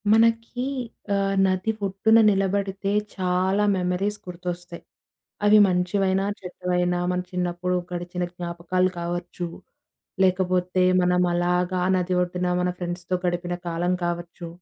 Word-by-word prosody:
మనకి 230 +2 +3 0.5
ఆహ్, 195 0 +1
నది 185 +3 0
ఒడ్డున 210 +4 +4
నిలబడితే 195 0 0 0.2
చాలా 185 +2 +1
మెమోరీస్ 185 +3 -1
గుర్తొస్తయి. 175 -1 -6 0.6
అవి 210 +1 +7
మంచివైనా, 190 +1 +1
చెడ్డవైనా, 180 -1 -1
మన 180 - 0
చిన్నప్పుడు 180 0 -1 0.2
గడిచిన 175 0 -3
జ్ఞాపకాలు 175 +1 -1
కావచ్చు. 175 +1 -4 0.8
లేకపోతే 185 0 +1 0.2
మనం 180 0 +3
అలాగా 180 +1 +1
ఆ - - 0
నది 180 0 0
ఒడ్డున 180 0 -1
మన 180 - +1
ఫ్రెండ్స్‌తో 175 0 -3
గడిపిన 175 0 -1
కాలం 170 +2 0
కావచ్చు, 175 0 -4
180 Hz, 110 wpm, -24 LUFS, 175-190 Hz, 0.8 s, అవి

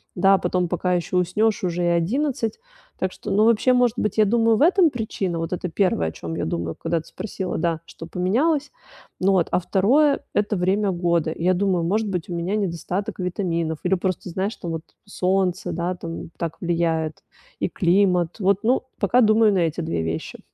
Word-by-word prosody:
да. 195 +2 +5
Потом 180 -1 0
пока 180 +1 -1
ещё 175 +1 -1
уснёшь, 200 +5 +1
уже 175 -1 -1
и - - +2
11. 225 - 0 0.4
Так 185 -1 -1
что, - - -6
ну, 210 +2 +4
вообще, 230 +2 +4
может 250 -2 +3
быть, 210 - -1
я 215 - +5
думаю, 225 +1 +3
в - - -2
этом 350 +2 +5
причина. 205 - -3
Вот 165 +2 -3
это 180 0 -3
первое 165 - +1
о - - -8
чём 80 0 -6
я - - -2
думаю, 85 0 -3
когда 165 0 -1
ты 160 - -12
спросила, 190 -1 -5
да, 165 -1 0
что 165 - -10
поменялось. 255 - 0 0.5
Ну 190 +2 +4
вот, 185 -4 +2
а - - +3
второе- 270 - +3
это 210 0 0
время 195 +3 +1
года. 170 -3 0
Я 180 +2 +2
думаю: 180 -2 +1
может 210 +4 0
быть, 180 -4 -3
у - - -3
меня 170 +4 -1
недостаток 190 0 -3
витаминов 170 -4 -2
или 180 - +1
просто, 185 0 -2
знаешь, 190 +5 -2
там, 170 - -5
вот 160 -1 -3 0.2
солнце, 185 -2 0
да, 175 +2 -2
там, 165 -1 -7
так 165 -1 -4
влияет 165 -2 -1 0.4
и - - 0
климат. 180 -1 +2
Вот, 195 +1 +2
ну, 245 +4 +2 0.2
пока 235 +5 +3
думаю 215 -1 +5
на 190 - +2
эти 165 -1 0
2 160 - -2
вещи. 80 0 -4
185 Hz, 195 wpm, -23 LUFS, 170-210 Hz, 0.5 s, да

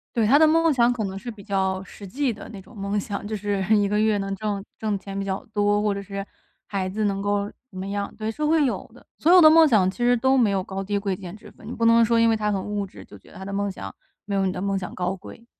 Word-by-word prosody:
对， 230 -2 +2
他 275 +8 +5
的 315 - +6
梦 325 0 +3
想 240 -1 +3
可 235 -3 -2
能 190 0 -5
是 225 +5 -7
比 215 -3 -10
较 190 -1 -1
实 195 +1 -11
际 265 +4 -1
的 210 - -11
那 200 -3 -9
种 230 - -17
梦 200 0 -2
想， 200 0 -5
就 215 - -3
是 200 -1 -2
一 205 -1 +3
个 210 +1 0
月 215 -1 +2
能 195 0 -3
挣 205 -1 -3 0.2
挣 215 -2 -1
钱 195 0 -8
比 200 - -2
较 195 0 -3
多， 205 0 +2
或 210 -1 +1
者 200 - -4
是 195 0 -6 0.4
孩 190 -2 -3
子 210 +3 -2
能 195 -1 -1
够 205 0 -1 0.2
怎 185 - -12
么 190 - -4
样， 200 0 -3
对， 220 0 -3
是 300 - -5
会 305 0 +3
有 255 - -3
的。 - - -18
所 335 - +3
有 365 - +9
的 310 -3 +9
梦 320 0 +7
想 205 -8 +3
其 - - -18
实 245 0 +3
都 265 +3 +3
没 230 -5 +4
有 190 -1 0
高 195 +1 -5
低 205 +1 -1
贵 200 -1 -1
贱 180 0 -9
之 215 - -14
分， 215 - -15
你 240 - -5
不 230 - -1
能 230 0 +6
说 230 0 +3
因 230 0 +4
为 225 - +3
他 210 -1 -1
很 195 -2 -2
物 205 -1 -3
质， - - -13
就 100 - -14
觉 - - -20
得 - - -13
他 190 - -8
的 200 - -6
梦 200 0 -1
想 95 - -8 0.3
没 205 - -4
有 195 -1 +1
你 185 - +1
的 180 - -5
梦 195 0 0
想 180 - -7
高 180 +1 -2
贵。 215 +4 -13
205 Hz, 325 characters per minute, -24 LUFS, 195-230 Hz, 0.4 s, 有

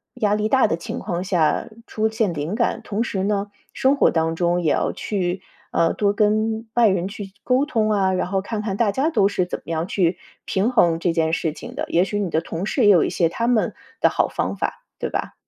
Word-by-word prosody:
压 210 -1 +1
力 210 0 +1
大 265 -1 +4
的 170 - 0
情 220 +8 -6
况 175 -3 -3
下 175 -5 +1 0.2
出 220 0 0
现 220 -5 0
灵 155 +7 -3
感， 235 - 0
同 210 +2 -1
时 195 -5 -2
呢， 200 0 -1 0.2
生 270 +2 +2
活 - - +5
当 165 0 0
中 175 0 +1
也 155 - +2
要 - - +1
去， 185 -2 -2 0.3
呃， 165 0 +2
多 200 -1 +1
跟 215 +2 +1
外 235 -2 +5
人 190 -2 +1
去 200 -2 -8
沟 255 +2 +2
通 225 -7 0
啊， 195 -2 +2
然 180 - -1
后 195 +1 0
看 210 +2 -4
看 200 -2 -3
大 220 -2 +2
家 285 +5 +1
都 205 -7 +3
是 185 -3 0
怎 - - -5
么 - - -30
样 165 0 -2
去 180 -3 +1 0.3
平 205 +6 0
衡 170 -9 +3
这 170 - +1
件 165 -1 0
事 165 -2 0
情 - - -10
的。 - - -2
也 175 - +3
许 205 - -3
你 195 - -1
的 160 - +1
同 165 +2 -5
事 245 +3 0
也 - - +7
有 180 -5 +6
一 - - 0
些 170 - +1
他 230 +7 -2
们 240 -3 +2 0.3
的 - - +4
好 - - +1
方 - - -2
法， - - -4 0.2
对 - - -2
吧？ - - -3
200 Hz, 260 characters per minute, -22 LUFS, 175-220 Hz, 0.3 s, 也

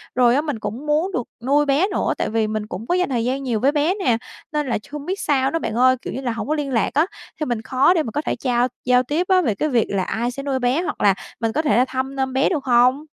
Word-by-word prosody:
rồi 245 -1 +4
á, 285 - +3
mình 295 -7 -4
cũng 220 +7 -5
muốn 305 +6 +1
được 245 -10 -3 0.2
nuôi 290 +3 +3
bé 285 +7 +2
nữa, - - 0
tại - - -1
vì 220 -1 0
mình 215 0 -3
cũng 215 +3 -7
có 355 - +2
dành 365 -2 +1
thời 235 -3 0
gian 265 +2 -1
nhiều 240 -5 -1
với 270 +6 +3
bé 300 +4 +1
nè, 260 - +1 0.3
nên 300 -2 -1
làch 235 -4 -1
hông 295 -1 -6
biết 380 +4 -3
sao 270 -2 +1
nữa 330 - 0
bạn 220 - -3
ơi, 255 +2 +5
kiểu - - -6
như 265 - -4
là, 245 -3 -1
hổng 225 - -4
có 305 - +1
liên 290 -3 -3
lạc 230 -3 +1
á, 305 +3 +3 0.3
thì 305 - -1
mình 240 -4 -2
khó 260 +8 +3
để 330 -4 +1
mà 230 - -5
có 295 - -1
thể - - -2
trao 245 -1 +1 0.2
giao 250 0 +4
tiếp 305 +8 -1
á, 375 -1 +4
về 230 - 0
cái 305 +10 -1
việc 240 -5 +2
là 195 -2 0
ai 235 +5 -2
sẽ 275 +2 -7
nuôi 275 -2 -1
bé 255 +6 +1
hoặc 360 - -4
là 200 -1 +5 0.3
mình 225 -1 0
có 310 - +1
thể 260 -9 +2
là 250 - +4
thăm 265 +1 -4
nom 265 -1 -1
bé, 265 +1 +2
được 305 -7 -1
hông? 255 +4 +3
265 Hz, 305 wpm, -21 LUFS, 240-295 Hz, 0.3 s, ơi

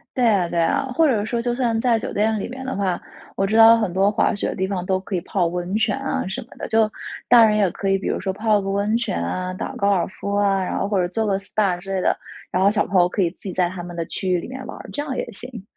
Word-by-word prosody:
对 250 -2 +2
啊 195 -6 +3
对 170 - -2
啊， 280 +12 +2
或 325 - +5
者 225 -8 +1
说， 235 +2 -2
就 240 0 -1
算 240 -3 0
在 240 -1 +3
酒 - - -5
店 220 +1 +1
里 - - -4
面 260 +1 -7
的 260 - -3
话， 190 -3 -1 0.4
我 195 - +1
知 215 +3 0
道 225 0 +9
很 215 -5 -1
多 195 +3 +3
滑 210 - +1
雪 205 - -2
的 - - -4
地 190 - 0
方， 190 -2 -3
都 185 0 +1
可 190 +1 -7
以 180 - +1
泡 175 +1 0
温 175 +2 -3
泉 220 - +1
啊 270 -7 -2
什 190 - -4
么 - - -15
的。 - - -5
就 220 -1 +2 0.4
大 235 -2 +8
人 210 -1 +3
也 200 -4 +3
可 195 - -4
以 195 - +3
比 195 - -4
如 - - -1
说 190 -1 -2
泡 215 +1 +2
个 195 - -5
温 200 +3 +1
泉 235 - -2
啊， 185 - -3
打 - - -4
个 - - -9
高 200 - +1
尔 190 -4 +2
夫 200 +1 -5
啊， 200 -1 +2
然 - - -3
后 195 - -1
或 200 -2 +1
者 180 - +1
做 220 +5 -1
个 195 -2 +1
SPA 195 -2 -1
之 195 +1 -5
类 190 - 0
的。 - - +1 0.3
然 180 - 0
后 195 - +6
小 210 0 +1
朋 190 - +1
友 175 - +5
可 180 - -3
以 170 - +1
自 180 - -22
己 190 - -5
在 180 -1 +1
他 180 0 -7
们 175 0 -8
的 170 -1 -3
区 190 - -5
域 180 -1 +2
里 - - -8
面 260 0 -7
玩 - - -7
儿， - - -11
这 290 - -4
样 290 -3 -4
也 - - -3
行。 235 0 -9
200 Hz, 345 characters per minute, -22 LUFS, 185-225 Hz, 0.4 s, 道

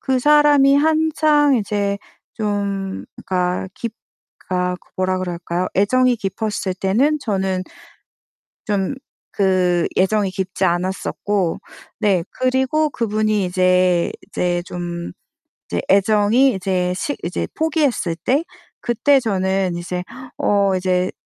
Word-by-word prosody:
그 265 -2 0
사람이 290 0 +5
한창 310 -1 +3
이제 200 -2 -1 0.4
좀 200 -3 -3 0.2
그러니까 180 0 -1
깊 230 -2 -5 0.5
그러니까 180 0 -2 0.2
뭐라 185 0 0
그럴까요? 175 0 -3
애정이 250 +5 +3
깊었을 205 -1 -3
때는 230 +12 +1
저는 190 -5 -1 1.0
좀 205 +4 -1 0.4
그 185 -3 +2
애정이 195 0 +2
깊지 190 0 -2
않았었고 185 +1 -1 0.4
네 190 -5 +2
그리고 260 +4 +1
그분이 215 -4 0
이제 180 -1 +2 0.2
이제 175 -1 -1
좀 175 - -5 0.6
이제 85 - -2
애정이 210 +6 +4
이제 180 -1 -1
식 285 +10 -2
이제 175 +2 -2
포기했을 295 - 0
때 280 +5 +2 0.4
그때 270 +4 +3
저는 190 -4 0
이제 180 +1 -4 0.3
어 200 -2 +2
이제 185 0 0
195 Hz, 230 characters per minute, -20 LUFS, 185-245 Hz, 1.0 s, 사람이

